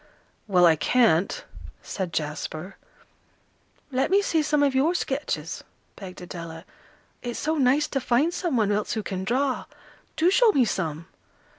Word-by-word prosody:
"Well, 180 -3 +5
I 165 -2 +6
can't," 215 - +2 0.4
said 185 -3 -4
Jasper. 155 +4 -4 1.2
"Let 260 +1 +1
me 400 +2 +4
see 325 -5 +1
some 300 -1 +2
of 280 -2 +2
your 295 +7 +2
sketches," 265 - -3 0.3
begged 185 -3 -10
Adela. 170 -2 -8 0.6
"It's 240 -1 -4
so 315 +2 -1
nice 275 +3 +3
to 270 - -1
find 260 +8 +2
some 345 -9 -1
one 210 -2 +2
else 205 0 0
who 220 - -2
can 190 -1 -4
draw. 255 +6 0 0.5
Do 340 +3 +3
show 455 +3 +5
me 260 -7 +4
some." 165 -6 -3
240 Hz, 150 wpm, -25 LUFS, 180-290 Hz, 1.2 s, I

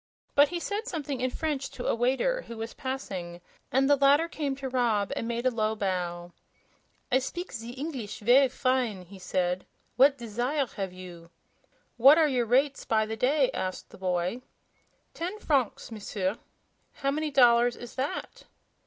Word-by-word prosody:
But 285 +1 +6
he 350 - -3
said 410 +5 -3
something 290 -6 -4
in 255 - +1
French 290 -1 -3
to 245 - -8
a - - +2
waiter 265 - +1
who 230 - -8
was 225 +1 -5
passing, 190 -10 -5 0.3
and 270 +1 +3
the 285 - +6
latter 285 +4 +4
came 290 -5 -3
to 270 0 -5
Rob 235 -6 +1
and 230 - -3
made 235 +1 -2
a 255 - +4
low 220 -2 0
bow. 175 -4 -3 0.8
"I 260 - +5
speak 350 +8 -5
ze 230 +2 -7
Eengliss 265 -7 -5
ver' 255 +5 +5
fine," 250 -7 0
he 190 +2 -13
said. 180 0 -1 0.3
"What 275 +2 +6
desire 245 +5 -1
have 195 -3 -3
you?" 175 -2 -11 0.7
"What 270 +6 +8
are 320 -2 +5
your 250 -4 0
rates 270 +4 +2
by 220 -1 +1
the 220 +1 -4
day?" 265 +3 +2
asked 185 0 -4
the - - -12
boy. 185 +5 -1 0.7
"Ten 360 +5 -4
francs, 275 - 0
M'sieur." 205 -1 -3 0.5
"How 275 -1 -1
many 305 +2 -1
dollars 240 -3 +5
is 240 - -10
that?" 270 +2 -4
245 Hz, 170 wpm, -28 LUFS, 210-275 Hz, 0.8 s, What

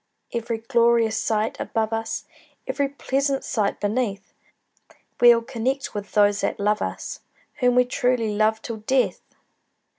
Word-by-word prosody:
Every 230 -1 -2
glorious 230 -1 +2
sight 220 0 -1
above 225 -1 -1
us, 225 0 -3 0.4
Every 280 -1 0
pleasant 275 0 -1
sight 215 -6 -1
beneath, 205 -2 -2 0.9
We'll 240 -1 +7
connect 265 +2 -2
with 205 -1 -6
those 205 -1 +4
that - - -1
love 210 +1 +1
us, - - -4 0.4
Whom 250 -2 +3
we 250 0 +5
truly 245 -3 0
love 215 +1 +1
till 230 -2 -5
death! 255 +5 0
230 Hz, 130 wpm, -24 LUFS, 215-250 Hz, 0.9 s, We'll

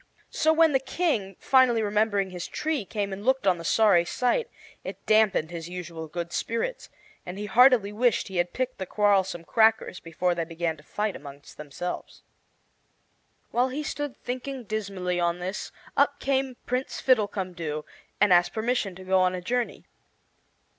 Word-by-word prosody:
So 315 - +3
when 320 0 +5
the 270 - +3
King, 265 - -1
finally 255 -4 +4
remembering 205 -2 +1
his 180 -1 -5
tree, 305 -8 -2
came 200 -1 -3
and 195 +1 -7
looked 260 -2 +2
on 180 -3 +3
the - - -7
sorry 195 -1 +4
sight, 250 - 0 0.3
it - - -8
dampened 215 -7 +3
his 170 -1 -6
usual 170 -3 -6
good 170 +2 -5
spirits, 230 - -2 0.3
and 180 +2 -7
he 210 - -4
heartily 225 -1 +5
wished 235 +1 +2
he 190 - -5
had 175 0 +1
picked 255 -2 -3
the 190 - -4
quarrelsome 195 -4 +2
crackers 220 -1 +2
before 175 +2 -1
they 170 -1 -2
began 165 0 -2
to - - -15
fight 210 +5 -2
among 140 0 -10
themselves. 150 +4 -6 1.3
While 250 +2 +2
he 285 +4 -4
stood 290 -2 -4
thinking 255 +1 -5
dismally 195 -4 -3
on 170 0 +1
this, 185 +3 -5 0.2
up 285 0 +2
came 265 -2 0
Prince 250 +2 -2
Fiddlecumdoo 185 - 0 0.4
and 205 -2 +5
asked 175 0 +4
permission 220 -4 -1
to 185 - -10
go 190 0 +2
on 185 0 +2
a - - -3
journey. 245 +5 -2
205 Hz, 165 wpm, -26 LUFS, 175-250 Hz, 1.3 s, when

